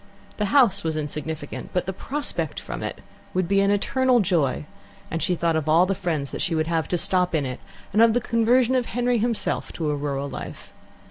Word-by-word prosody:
The 210 - 0
house 230 -4 +4
was 160 -1 -1
insignificant, 155 +1 -5
but 180 - 0
the 190 - -3
prospect 290 +9 -3
from - - -6
it - - -5 0.3
would 185 -1 +1
be 195 +2 +3
an 200 - +3
eternal 250 +5 +3
joy, 155 - +1 0.5
and 165 - -2
she 180 - +1
thought 170 -1 +1
of 155 -1 -1
all 165 +3 +6
the 195 - 0
friends 165 -7 -2
she 170 -4 0
would 155 0 +1
have 165 -1 0
to 175 - 0
stop 180 0 +1
in 145 -3 +1
it, 130 0 -5 0.3
and 215 - +4
of 230 -1 +6
the 245 - +3
conversion 235 +2 +3
of 255 -2 +1
Henry 245 0 +1
himself 230 0 -1
to 155 -3 -1
a - - 0
rural 140 -1 -2
life. - - -8
180 Hz, 210 wpm, -24 LUFS, 155-230 Hz, 0.5 s, all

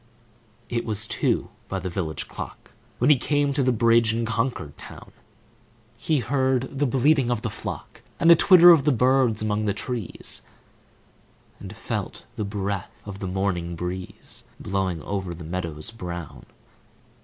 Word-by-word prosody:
It 120 -1 -2
was 110 -1 0
two - - 0 0.2
by 95 - -2
the 95 0 -4
village 85 -4 -3
clock, - - -9 0.3
When 125 +5 +4
he 145 - +6
came 145 +2 +1
to 140 - +1
the 130 -1 +3
bridge 115 -1 +4
in 115 0 -1
Concord 115 - -2
town. - - -11 0.8
He 155 - 0
heard 130 +1 0
the 145 - +3
bleating 135 +1 +3
of 120 -2 -1
the 110 - -2
flock, - - -7 0.2
And - - +2
the 170 - +10
twitter 175 0 +8
of 160 -5 +6
birds 125 -4 +3
among 105 0 0
the 100 -1 0
trees, 115 -1 -3 1.2
And - - -9
felt - - -5
the 105 - -2
breath 100 -1 -3 0.2
of 100 -1 -7
the 95 - -4
morning 90 -2 -1
breeze 90 +2 -6 0.2
Blowing 95 -4 -2
over 95 0 -3
the 85 - -9
meadows 85 +1 -3
brown. 85 -7 -7
110 Hz, 155 wpm, -24 LUFS, 95-130 Hz, 1.2 s, the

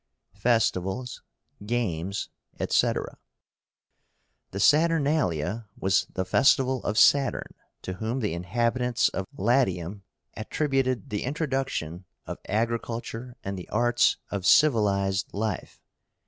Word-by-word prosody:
FESTIVALS, 115 +1 0 0.4
GAMES, 100 -5 -2 0.3
ETC. - - 0 1.3
The 100 - -6
SATURNALIA 145 - +2
was 95 +1 +1
the 95 - -2
festival 130 +5 +3
of 105 - -2
Saturn, 140 -3 +3 0.3
to 95 - -4
whom 110 +7 -3
the 105 -8 -1
inhabitants 120 +7 0
of 95 -1 -4
Latium 100 -5 +1 0.3
attributed 130 -2 -1
the 105 - -2
introduction 135 - -3 0.2
of - - -6
agriculture 115 +2 -3
and 100 0 -4
the 90 - -10
arts 120 +2 +2
of 100 -2 -3
civilized 100 -6 +3
life. 110 +1 -3
115 Hz, 100 wpm, -26 LUFS, 95-130 Hz, 1.3 s, festival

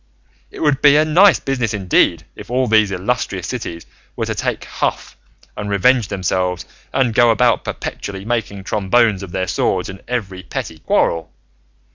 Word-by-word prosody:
It - - -10
would 145 -3 +2
be 145 -1 +6
a 155 +1 +4
nice 180 +6 +5
business 125 -5 -2
indeed 90 -3 +2
if 105 - -11
all 130 +1 +1
these 110 -3 +3
illustrious 95 -1 -2
cities 90 -7 -5 0.3
were - - -2
to - - -2
take - - -3
huff - - -3 0.4
and 105 0 -5
revenge 110 +3 +3
themselves 90 -2 -1 0.3
and 130 -4 +1
go 120 +1 +5
about 120 +2 +3
perpetually 95 0 -6
making 110 -4 -2
trombones 105 +1 +2
of 95 -3 -8
their 95 0 -1
swords - - -1
in 95 +1 -9
every 100 -7 -3
petty 80 -3 -6
quarrel! 80 +1 0
105 Hz, 160 wpm, -18 LUFS, 95-125 Hz, 0.4 s, be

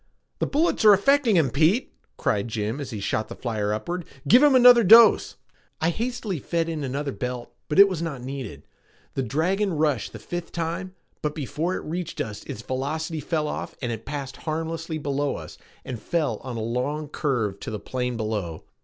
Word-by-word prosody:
"The - - 0
bullets 305 -2 +1
are 210 -1 +9
affecting 245 +2 +4
him, 155 -7 +3
Pete!" 165 - +2 0.2
cried 100 +1 0
Jim 110 +3 -3
as 140 - -5
he 110 -5 -5
shot 110 +2 -1
the - - -8
flyer 110 -4 -2
upward. 170 +12 -3 0.2
"Give 245 - +7
him 290 -2 +6
another 245 -1 +8
dose!" 225 +3 +7 0.4
I 165 +2 +2
hastily 225 -4 -3
fed 165 +4 -1
in 160 -3 -3
another 140 +2 -2
belt, 125 -1 -5 0.2
but 150 - -1
it 200 0 +10
was 185 -4 -3
not 145 -7 -4
needed. 130 - -6 0.5
The - - -1
dragon 180 - 0
rushed 150 -7 0
the - - -8
fifth 175 -1 -6
time, 170 +3 -3 0.3
but 150 -1 -2
before 160 +4 -2
it - - -5
reached 170 0 -4
us 105 -2 -4
its 115 - -7
velocity 155 +5 -3
fell 155 +1 -1
off - - -5
and 120 -2 -3
it 110 -1 -5
passed 140 -2 -5
harmlessly 165 0 -3
below 145 -1 -1
us - - -9 0.3
and 120 -4 -6
fell 150 -5 0
on 125 0 -7
a - - -3
long 130 +7 -2
curve 120 -10 -1
to - - -6
the 105 -1 -4
plain 125 0 -3
below. 105 -7 -3
150 Hz, 190 wpm, -25 LUFS, 125-175 Hz, 0.5 s, it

